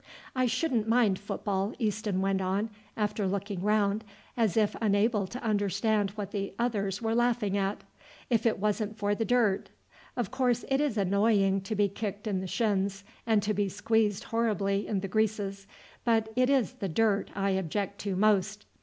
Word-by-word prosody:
"I 255 -1 +2
shouldn't 240 -2 0
mind 225 -5 +3
football," 200 0 -2
Easton 210 -4 -1
went 195 0 +1
on, 195 +4 -1 0.3
after 210 -2 0
looking 200 -1 -3
round 210 +1 +2 0.3
as 225 -6 +1
if 215 -2 +2
unable 210 -1 +2
to 245 +7 -7
understand 205 -1 +1
what 205 -2 -5
the 195 -1 -3
others 205 -4 -1
were 225 0 +1
laughing 235 -4 +1
at, 200 0 -1 0.4
"if 230 -2 +2
it 225 - +1
wasn't 210 +1 -1
for 205 -1 +1
the 225 +2 -1
dirt. 230 -6 +2 0.5
Of 240 -5 -1
course 245 -2 +1
it 270 +1 +2
is 285 -7 0
annoying 200 0 +3
to 195 +3 -4
be 205 0 +3
kicked 200 +1 -5
in 200 -3 0
the 190 - -4
shins 200 -2 0 0.2
and 220 -3 +3
to 215 - 0
be 205 -1 0
squeezed 220 +1 +1
horribly 210 -4 0
in 200 -3 -1
the 195 - -3
greases, 200 -1 -1 0.4
but 225 -2 +2
it 255 +1 +3
is 265 -3 +2
the 205 -7 -4
dirt 205 +2 +1
I 195 0 +1
object 190 +2 -2
to 200 -2 -2
most. 205 0 +2
210 Hz, 175 wpm, -29 LUFS, 195-225 Hz, 0.5 s, mind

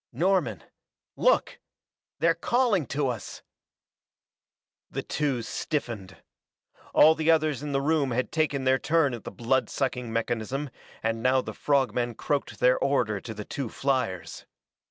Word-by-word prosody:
"Norman 150 - +1 0.5
look - - +2 0.6
they're 165 +2 +3
calling 210 - +1
to 140 0 0
us!" 120 -4 -5 1.5
The - - -4
two 140 -6 -1
stiffened. 115 - -4 0.7
All 155 +1 +7
the 160 0 -1
others 155 -4 +3
in 150 -1 -4
the 135 0 +1
room 150 -2 +2
had 125 +1 -1
taken 150 -4 0
their 130 0 +3
turn 155 -5 +2
at 120 - -7
the - - -5
blood 130 +3 0
sucking 125 -3 -2
mechanism 120 +4 -2 0.3
and 115 0 -1
now 130 +2 +3
the - - -7
frog 140 -3 +1
men 120 -1 -1
croaked 145 +4 -2
their 125 0 +4
order 120 -7 +1
to 115 - -7
the 105 0 -6
two 135 -5 -4
fliers. 130 -11 -2
135 Hz, 145 wpm, -27 LUFS, 120-150 Hz, 1.5 s, All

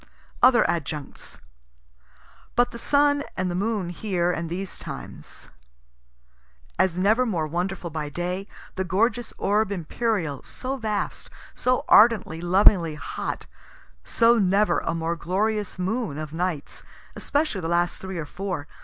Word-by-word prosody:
Other 245 -1 +6
adjuncts. 155 -4 -4 1.2
But 245 +1 +3
the 235 - -8
sun 285 +2 +3
and 185 -1 0
the 180 +2 -1
moon 210 -5 -1
here 180 -1 -1
and 165 -1 -3
these 185 +3 -5
times. - - -9 1.3
As 180 -2 +2
never 215 +7 +3
more 180 -10 -1
wonderful 175 +2 -3
by 150 -1 -4
day, 180 +5 -3 0.3
the 190 - +1
gorgeous 225 +6 0
orb 205 +1 +1
imperial, 180 - -2
so 260 +2 -5
vast, 215 -4 -3 0.2
so 255 +3 0
ardently, 210 -7 +5
lovingly 175 -2 +4
hot 150 - -5 0.6
so 230 - +4
never 195 -1 +3
a - - -2
more 165 +1 -1
glorious 205 +5 -1
moon 190 - -2
of 155 -1 -6
nights, 170 -3 -3 0.3
especially 285 -9 -1
the 165 - -3
last 170 +1 +1
three 190 -1 -6
or 165 - -3
four. 180 -2 -5
185 Hz, 135 wpm, -25 LUFS, 170-220 Hz, 1.3 s, Other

